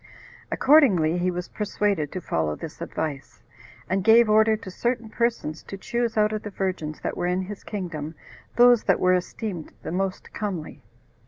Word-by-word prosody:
Accordingly, 190 - +4
he 180 +1 +1
was 180 0 -4
persuaded 200 -7 -1
to 185 - -5
follow 80 - -1
this - - -9
advice, 135 -8 -5 0.4
and 190 +3 0
gave 225 +1 +6
order 220 0 +5
to 190 - -9
certain 235 +2 -2
persons 230 -9 -1
to 195 - -8
choose 235 +3 -2
out 215 0 +3
of 215 - -2
the 210 - -6
virgins 185 -6 -3
that - - -3
were 175 - -1
in 180 +1 0
his 200 +2 -8
kingdom 165 -6 -5 0.4
those 245 -1 +6
that 195 - +3
were 185 0 +4
esteemed 180 -1 -3
the - - -4
most 190 +1 -3
comely. 190 -7 -4
190 Hz, 170 wpm, -25 LUFS, 170-220 Hz, 0.4 s, gave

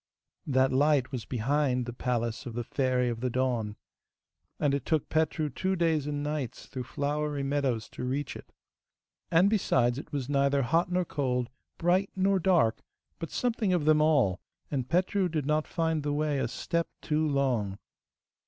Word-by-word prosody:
That 130 -1 +3
light 140 -1 +3
was 125 -5 -4
behind 125 +1 0
the 120 - -5
palace 120 -1 -2
of 115 - -7
the 120 - -2
Fairy 125 0 0
of 120 -1 -2
the 125 +1 -1
Dawn, 120 -4 -1 0.8
and 145 -2 +2
it 140 - -1
took 155 -3 0
Petru 155 -1 +1
two 190 +8 -1
days 160 -4 +1
and 145 -1 -2
nights 150 -5 -3
through 130 -2 -6
flowery 145 +1 -2
meadows 135 -5 0
to - - -7
reach 135 +3 -2
it. - - -11 0.8
And 170 +4 +5
besides, 125 - +2
it 155 - -10
was 140 -4 -3
neither 140 0 +2
hot 165 +8 +1
nor 180 0 +1
cold, 125 -5 -1 0.3
bright 180 +3 +2
nor 195 0 +2
dark, 170 -11 +3 0.4
but 165 - -5
something 225 -6 0
of 170 -5 +1
them 155 0 +5
all, 140 - +3 0.3
and 130 -4 -2
Petru 185 +2 +2
did 155 -4 -2
not 150 +1 +1
find 160 -2 0
the 145 0 -1
way 150 -1 0
a 130 - 0
step 170 +7 -2 0.2
too 155 0 +1
long. 125 -9 0
145 Hz, 170 wpm, -29 LUFS, 125-160 Hz, 0.8 s, And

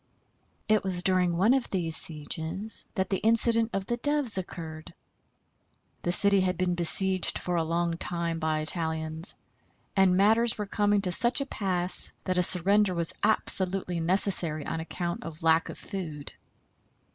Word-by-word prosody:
It 215 -1 +2
was 180 -2 -1
during 180 -2 +1
one 210 +8 +3
of 265 -2 -1
these 165 -4 -2
sieges 160 +7 +1
that 190 -1 -2
the 195 - 0
incident 230 +1 +3
of 195 -1 -4
the 240 - -3
Doves 290 -3 0
occurred. 165 -3 -8 1.1
The 175 - -2
city 200 +2 +5
had 185 -1 -1
been 180 -1 -1
besieged 185 +2 +1
for 180 - -4
a 170 - +1
long 170 +1 -2
time 170 -1 -3
by 155 -1 -1
Italians, 160 +1 -3 0.6
and 190 -2 +3
matters 220 +4 +3
were 210 - -4
coming 205 0 0
to 180 - 0
such 240 +9 +3
a 275 - -3
pass 185 -7 +1
that 185 -1 -1
a - - +4
surrender 190 +2 +2
was 170 -1 +1
absolutely 190 -4 0
necessary 170 -3 +2
on - - -4
account 170 +1 -5
of 165 -1 -9
lack 160 0 +2
of - - -8
food. 160 -8 -7
180 Hz, 155 wpm, -27 LUFS, 165-200 Hz, 1.1 s, city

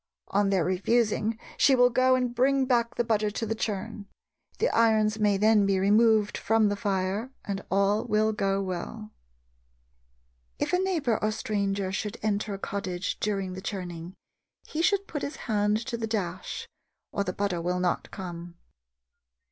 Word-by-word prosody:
On 200 0 +2
their 190 -4 +2
refusing, 215 +3 +1 0.2
she 270 - +5
will 245 0 +5
go 255 +1 +4
and 250 -1 -1
bring 265 +2 +3
back 235 -2 +1
the 240 - +1
butter 215 -2 +1
to 225 +2 -3
the 225 - -1
churn. 215 -1 -4 0.5
The 465 - +2
irons 220 -1 +3
may 205 -2 +3
then 210 0 +4
be 195 -1 +2
removed 210 +2 +3
from 225 -1 +3
the 205 - 0
fire 200 +2 -1 0.2
and 200 -1 -3
all 200 +2 +2
will 215 +1 +2
go 195 -1 0
well." 195 +4 -5 1.5
If - - -2
a 360 - +4
neighbor 320 - 0
or 215 - +3
stranger 200 -3 -1
should 210 +3 -3
enter 205 -1 -1
a - - -6
cottage 190 -2 -3
during 195 -3 -1
the 185 - -7
churning, 180 -3 -6 0.5
he 315 - -3
should 395 +3 +2
put 295 -6 -5
his 285 - -4
hand 210 -2 +2
to 240 -2 -3
the 225 -1 -3
dash, 190 -5 -3 0.4
or 200 - -1
the 185 - -2
butter 185 -3 -2
will 180 +1 -1
not 180 -1 -1
come. 175 -2 -7
210 Hz, 165 wpm, -27 LUFS, 195-230 Hz, 1.5 s, she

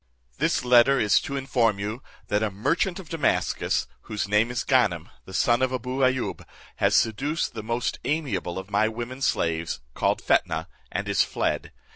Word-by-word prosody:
"This - - +1
letter 125 +2 +6
is 105 - +4
to 140 - -5
inform 120 -6 +1
you, 105 +5 -4 0.3
that 105 +1 +1
a 110 - +1
merchant 145 - 0
of 190 -4 -9
Damascus, 160 -3 0 0.2
whose 105 -1 -2
name 105 +3 +3
is 125 -1 -2
Ganem, - - +2 0.2
the 95 - -11
son 120 +5 +3
of 130 -1 +2
Abou 130 +1 -3
Ayoub, 130 -1 0 0.3
has - - +3
seduced 140 +9 +1
the 110 - -5
most 115 +3 -2
amiable 125 - -2
of 95 +2 -7
my 105 +2 +3
women 120 +4 -6
slaves, 85 - 0
called - - +1
Fetnah, - - +1 0.3
and - - -3
is - - +2
fled. - - -1
120 Hz, 170 wpm, -25 LUFS, 105-130 Hz, 0.3 s, letter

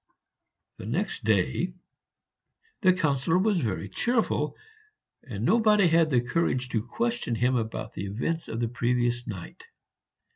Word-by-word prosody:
The 95 - -8
next 170 - -2
day 110 - +1 1.1
the 185 -3 +6
Councillor 160 -2 +1
was 200 0 +2
very 100 -4 -2
cheerful, 240 - 0 0.6
and 110 -3 -5
nobody 215 - +4
had 165 -1 +4
the 125 -4 +3
courage 125 -2 0
to 115 -3 0
question 235 - -1
him 125 +3 +2
about 110 0 -3
the 100 - -5
events 145 +12 -2
of 115 - -4
the 120 - +1
previous 120 +1 0
night. 95 -6 -8
125 Hz, 135 wpm, -27 LUFS, 115-180 Hz, 1.1 s, the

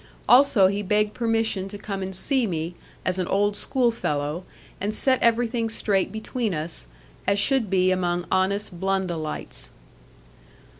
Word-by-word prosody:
Also 250 -6 +6
he 200 +2 +1
begged 210 +1 +1
permission 225 -4 0
to 205 - -8
come 200 -1 -5
and 190 0 -4
see 255 +5 +2
me, 165 -1 -3 0.3
as 185 0 +1
an 180 - -1
old 205 +1 +1
schoolfellow, 175 - -1 0.4
and 210 +2 -1
set 260 +2 +2
everything 235 0 +2
straight 200 -3 0
between 220 -2 -3
us, 155 - -5 0.4
as 200 - +3
should 230 +1 +2
be 185 -1 +3
among 175 -1 0
honest 190 -1 0
Blundellites. 185 -5 -2
200 Hz, 140 wpm, -24 LUFS, 185-225 Hz, 0.4 s, Also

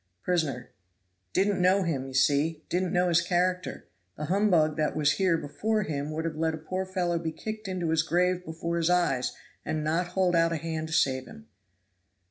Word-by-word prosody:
Prisoner. 150 -9 -1 0.6
"Didn't 195 - +1
know 190 +2 +4
him, 140 -6 -2
you 130 - -8
see 145 +4 +2
didn't 180 0 0
know 180 0 +2
his 170 -1 +4
character; 180 +1 -1 0.3
the 150 - -3
humbug 175 -4 +3
that 155 -1 0
was 150 -1 +3
here 185 -2 +2
before 215 +9 -1
him 145 -3 -3
would 160 +1 -3
have 160 -2 -3
let 160 0 0
a - - -7
poor 185 +4 -4
fellow 175 -3 -1
be 165 -1 -3
kicked 215 +6 -6
into 180 -3 -2
his 160 -1 +3
grave 180 +2 +1
before 165 +1 -3
his 165 0 +1
eyes, 170 -8 +1 0.3
and 155 -1 -2
not 165 +4 0
hold 180 -2 +3
out 165 0 +3
a - - 0
hand 160 0 -4
to 160 - -6
save 130 -1 +1
him." 220 0 -12
165 Hz, 195 wpm, -28 LUFS, 155-180 Hz, 0.6 s, know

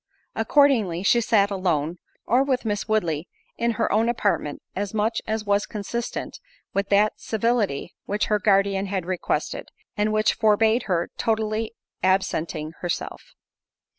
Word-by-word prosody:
Accordingly, 225 - +3
she 235 +4 +4
sat 205 -3 +3
alone, 175 -4 0 0.3
or 250 +3 +3
with 260 -3 0
Miss 205 -1 -1
Woodley 175 -7 0 0.3
in 235 0 0
her - - +1
own 225 +2 +3
apartment 205 -10 -1
as 205 +2 -3
much 220 +2 +1
as 220 0 -2
was 205 0 +1
consistent 225 +3 -4 0.3
with 200 0 -1
that 205 +1 +3
civility 220 - 0
which 205 +1 0
her 210 -1 +1
guardian 195 -1 +2
had 190 -3 -2
requested, 185 -1 -2 0.3
and 210 0 +1
which 215 0 +3
forbade 220 +1 +3
her 170 -2 0
totally 220 0 -1 0.3
absenting 160 -5 0
herself. 175 - -5
210 Hz, 135 wpm, -24 LUFS, 190-225 Hz, 0.3 s, she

